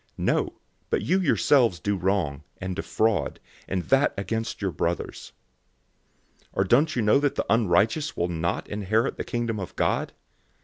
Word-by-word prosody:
006:008 - - -3
No, - - +1 0.4
but - - 0
you 185 +4 +2
yourselves 130 - +3
do 100 +3 0
wrong, 90 -7 0 0.2
and 95 -1 -4
defraud, 110 +2 0 0.3
and 95 -2 -1
that 135 +7 +2
against 110 +3 -3
your 95 -2 -1
brothers. 85 +2 -3 1.1
006:009 - - -31
Or 95 - +2
don't 140 - +3
you 120 - +1
know 105 +6 +5
that 145 -1 0
the - - -1
unrighteous 110 - +2
will 85 - +1
not 85 -1 -2
inherit 105 +2 0
the - - -3
Kingdom 115 -2 -2
of 95 - -6
God? - - 0
105 Hz, 165 wpm, -26 LUFS, 90-120 Hz, 1.1 s, know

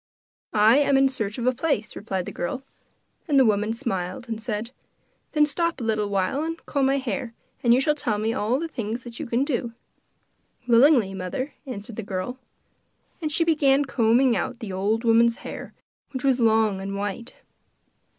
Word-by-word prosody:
'I 215 +4 +6
am 280 -1 +4
in 270 0 +5
search 220 -6 -3
of 240 - -3
a 255 - +3
place,' 260 -5 -1
replied 190 -4 -3
the - - -6
girl; 260 +10 -4 0.6
and 285 -3 +4
the 265 - +6
woman 210 0 +2
smiled 225 +1 -3
and 225 -1 -4
said: 220 0 -3 0.6
'Then 300 -1 +5
stop 335 +3 -1
a - - -4
little 215 -2 0
while 195 +8 0
and 330 +1 -3
comb 275 -2 +1
my 275 +1 +2
hair, 240 -2 -3 0.3
and 235 - +3
you 245 - +6
shall 300 +3 +2
tell 235 -8 -1
me 220 +2 0
all 225 +5 0
the 335 - -3
things 235 -3 -5
you 305 - -4
can 235 +3 +1
do.' 240 -5 -2 0.9
'Willingly, 240 -4 +5
mother,' 195 +10 -4
answered 210 -3 -7
the - - -2
girl. 200 +5 -4 0.8
And 310 -2 -2
she 330 - +2
began 290 -4 +3
combing 240 0 +3
out 250 - -2
the 220 -5 -6
old 210 +5 0
woman's 230 0 +4
hair, - - -7 0.4
which 260 - -4
was 265 -2 +3
long 220 -4 +3
and 195 +1 -4
white. 205 +3 -4
235 Hz, 180 wpm, -24 LUFS, 210-270 Hz, 0.9 s, I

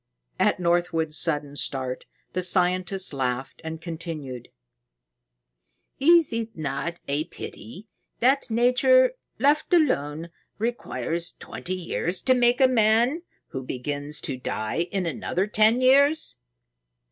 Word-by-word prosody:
At - - +2
Northwood's 170 -3 0
sudden 145 -3 +1
start, 130 -3 -2 0.3
the 185 - -1
scientist 185 0 +2
laughed 130 -1 -3
and 160 0 -6
continued: 160 -7 -6 1.5
"Is 330 -1 +5
it 225 -2 -4
not 155 +3 -3
a 145 +3 -1
pity 170 - -10 0.3
that 265 +2 +2
Nature, 250 - +4 0.2
left 290 +5 +2
alone, 165 - 0 0.3
requires 170 - -3
twenty 185 - -5
years 180 0 -3
to 260 - +4
make 245 0 +3
a 265 - +6
man 240 +5 +2 0.3
who 130 - -5
begins 145 +3 -5
to 135 - -3
die 125 +7 -3
in 195 -2 -1
another 175 +3 -2
ten 215 +3 +3
years? 280 +4 +3
180 Hz, 115 wpm, -25 LUFS, 150-240 Hz, 1.5 s, a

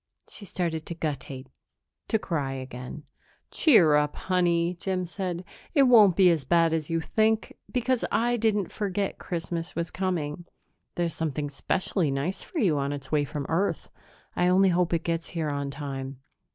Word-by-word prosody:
She 205 - -9
started 165 -4 -3
to 170 - -4
guttate 140 -4 -4 0.6
to 220 - +2
cry 145 -10 -2
again. 130 +2 -7 0.5
"Cheer 195 - +5
up, 150 0 +2
honey," 175 -2 +1
Jim 185 -1 -1
said. 180 -1 -4 0.3
"It 280 - +6
won't 220 -8 +7
be 185 -2 +6
as 160 -4 0
bad 165 +3 +3
as 160 -2 -2
you 165 0 +1
think, 220 +6 +1 0.2
because 250 -1 0
I 240 +1 +2
didn't 210 -5 +1
forget 200 -1 -2
Christmas 170 -1 -4
was 170 0 -2
coming. 175 -4 -2 0.5
There's 170 -2 -1
something 150 -2 -3
specially 165 +3 0
nice 140 +7 -2
for 360 - -9
you 180 - +2
on 140 0 -1
its 140 -1 -7
way 150 -2 +2
from 145 0 -5
Earth; 185 +5 -1 0.4
I 180 - +2
only 190 +1 +5
hope 175 -1 +2
it 170 -1 0
gets 165 0 -2
here 160 -3 -2
on 140 -1 -2
time." 135 -2 -6
170 Hz, 165 wpm, -27 LUFS, 150-190 Hz, 0.6 s, won't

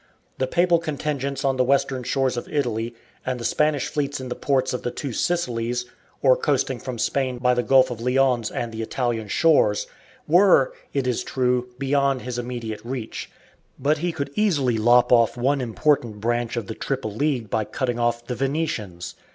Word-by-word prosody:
The 130 - +1
papal 175 +3 +3
contingents 145 -4 -3
on 135 -1 +1
the 130 - +4
western 135 0 +1
shores 130 +1 0
of 120 - -5
Italy 120 -5 -1 0.3
and 130 -1 -2
the 115 - -5
Spanish 150 -3 +1
fleets 145 -1 -2
in 130 -1 -6
the - - -3
ports 130 -2 0
of 125 - -3
the - - -2
Two 135 0 -5
Sicilies, 125 -7 -1 0.4
or 130 -2 +6
coasting 135 -3 0
from 125 +1 -6
Spain 130 +1 0
by 125 0 +2
the 125 - +1
Gulf 130 0 +4
of 115 -2 -6
Lyons 125 -2 +2
and 120 -1 -4
the 110 0 -5
Italian 115 -1 -2
shores, 105 -4 +3 0.4
were, 175 -4 +5 0.2
it 140 -2 -1
is 125 -3 0
true, 125 -1 0
beyond 135 0 +1
his 125 -1 -4
immediate 120 -3 -5
reach, 120 -2 -5 0.5
but 145 +3 +1
he 175 +2 -1
could 140 -3 -4
easily 140 - +1
lop 120 +2 +5
off 115 -1 +4
one 135 +3 +1
important 120 -2 0
branch 120 +2 -1
of 115 - -2
the 110 - -5
triple 130 -4 -3
League 125 -3 -1
by 110 - +1
cutting 120 +2 -2
off 120 0 0
the 125 - -3
Venetians. 125 - -3
125 Hz, 185 wpm, -23 LUFS, 120-140 Hz, 0.5 s, or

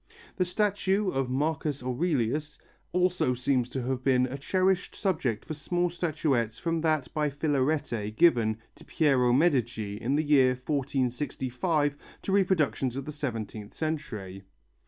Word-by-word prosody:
The 185 - +2
statue 200 +1 +1
of 135 -1 -1
Marcus 145 0 -1
Aurelius 145 +1 -1 0.3
also 180 -8 +1
seems 125 -1 0
to 130 -1 -3
have 130 0 -2
been 130 -1 +3
a 130 +1 -5
cherished 185 +6 0
subject 150 - -1
for 155 - -4
small 175 +3 -1
statuettes 145 -10 0
from 165 -1 -1
that 155 -5 0
by 150 -1 +1
Filarete 140 -6 0
given 115 -8 +4 0.2
to - - -16
Piero 135 -6 +2
Medici 120 -8 +1
in 130 +6 -1
the 155 - +2
year 130 -4 +4
1465 140 +2 -1 0.3
to - - -2
reproductions 155 - +2
of 135 0 -4
the 150 - -5
seventeenth 115 -7 -5
century. 120 - -4
140 Hz, 135 wpm, -28 LUFS, 125-160 Hz, 0.3 s, given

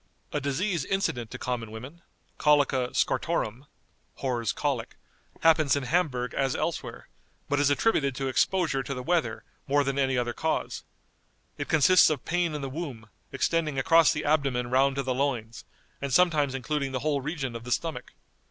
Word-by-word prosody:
A 150 - -1
disease 160 +4 -1
incident 130 - -1
to - - -7
common 120 -3 -3
women, 130 +10 -9 0.4
Colica 140 -4 +3
scortorum 120 +7 -1 0.6
(W 125 -3 -1
's 110 - +1
Colic), 135 -6 -2 0.5
happens 155 -3 +4
in 140 - -2
Hamburg 125 -5 0
as 135 -2 0
elsewhere, - - -4 0.4
but 145 - 0
is 145 -1 +3
attributed 145 - +2
to 135 +1 -2
exposure 145 +2 +1
to 135 - -5
the 125 - -5
weather 170 +2 0 0.2
more 145 +1 +3
than 135 0 -1
any 135 -1 +1
other 120 -1 -1
cause. 160 - -2 0.8
It - - -4
consists 165 +3 +6
of 150 -5 -3
pain 175 -2 0
in 150 - -4
the 135 - -3
womb, 130 -6 -6 0.2
extending 155 +1 0
across 165 +4 +5
the 150 - -3
abdomen 135 -5 +1
round 135 +1 +3
to 140 - -1
the 130 0 -1
loins, 125 -4 -2 0.4
and 140 -1 -3
sometimes 150 -3 +3
including 135 +1 -2
the 130 - -2
whole 145 -1 0
region 135 -4 -4
of 115 - -6
the 125 - -7
stomach. 165 +5 -2
140 Hz, 170 wpm, -27 LUFS, 125-155 Hz, 0.8 s, consists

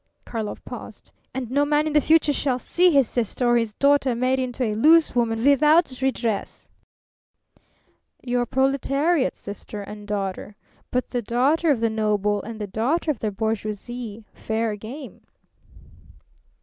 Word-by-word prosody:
Karlov 220 -3 -5
paused. - - -10 0.2
"And 250 -2 -5
no 285 +2 +3
man 295 +1 +2
in 310 - -2
the 300 - +5
future 310 -1 +3
shall 270 -3 0
see 360 +8 +2
his 275 -7 +4
sister 240 +2 -2
or 240 - +4
his 230 -3 0
daughter 280 -3 +3
made 255 +2 +1
into 255 0 -2
a 215 -3 0
loose 310 +9 +5
woman 225 -2 0
without 285 0 +4
redress." 235 -5 -2 1.6
"Your 245 -1 0
proletariat's 275 +4 +1
sister 205 +1 -7
and 210 +1 -10
daughter. 200 0 -4 0.3
But 250 0 -2
the 245 - -1
daughter 265 +9 +1
of 265 -6 +2
the 230 -1 +1
noble 210 -2 0
and 220 +2 -8
the 210 - -3
daughter 255 - 0
of 265 - -6
the 215 - -1
bourgeoisie 220 +1 -4
fair 220 -1 -2
game!" 250 +7 -9
245 Hz, 150 wpm, -23 LUFS, 220-280 Hz, 1.6 s, the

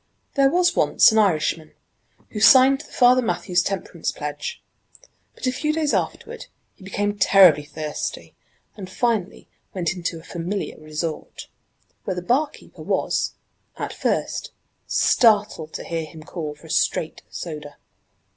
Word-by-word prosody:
There 275 -1 +4
was 355 +3 +2
once - - +5
an 220 - +3
Irishman, 160 -5 +1 0.6
who 215 - -5
signed 265 +4 +7
the - - -16
Father 250 0 +5
Mathew's 180 -6 0
temperance 195 +1 -3
pledge. 475 0 -6 0.7
But - - -7
a 255 - +2
few 300 +4 -1
days 305 -1 0
afterward - - -3 0.3
he - - -18
became 205 +2 -2
terribly 185 -6 +6
thirsty, 150 0 -5 0.4
and 190 -3 -8
finally 215 -2 -2 0.3
went 175 -2 -1
into 175 -2 -4
a - - -15
familiar 180 +4 -4
resort, 155 +1 -6 0.5
where 185 - -3
the 180 - -5
barkeeper 270 +10 -2
was, - - -1 0.4
at - - -4
first, - - -2 0.4
startled 210 -8 +3
to - - -5
hear 165 -1 -3
him 155 0 -12
call 155 -3 -6
for 150 - -18
a 160 - -8
'straight' 160 - 0
soda. 150 -3 -7
190 Hz, 140 wpm, -22 LUFS, 160-240 Hz, 0.7 s, signed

